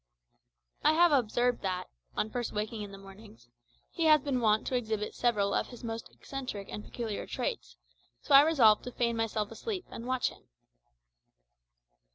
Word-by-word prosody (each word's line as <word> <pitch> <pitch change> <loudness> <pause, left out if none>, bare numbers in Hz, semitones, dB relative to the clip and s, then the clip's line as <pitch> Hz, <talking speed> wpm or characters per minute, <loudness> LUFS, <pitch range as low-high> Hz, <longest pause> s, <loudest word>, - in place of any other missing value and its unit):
I 310 - +5
have 345 +1 +5
observed 245 -2 +2
that, 185 -1 -2 0.3
on 215 - -1
first 245 -2 -3
awaking 215 +1 -3
in 205 -1 -6
the 195 - -9
mornings, 195 - -15 0.4
he 335 - -1
has 310 -1 +7
been 270 -2 -1
wont 215 -1 +3
to 255 - -1
exhibit 220 -3 -2
several 210 -5 +1
of - - 0
his 245 -1 -12
most 225 -1 -5
eccentric 255 -8 -7
and 210 - -6
peculiar 225 -4 -5
traits, - - -4 0.4
so - - -1
I 275 - +11
resolved 260 -9 +5
to 250 - -5
feign 235 -1 0
myself 220 -2 -1
asleep 375 - -5
and 230 - -7
watch 255 -1 +1
him. - - -17
230 Hz, 170 wpm, -30 LUFS, 210-255 Hz, 0.4 s, I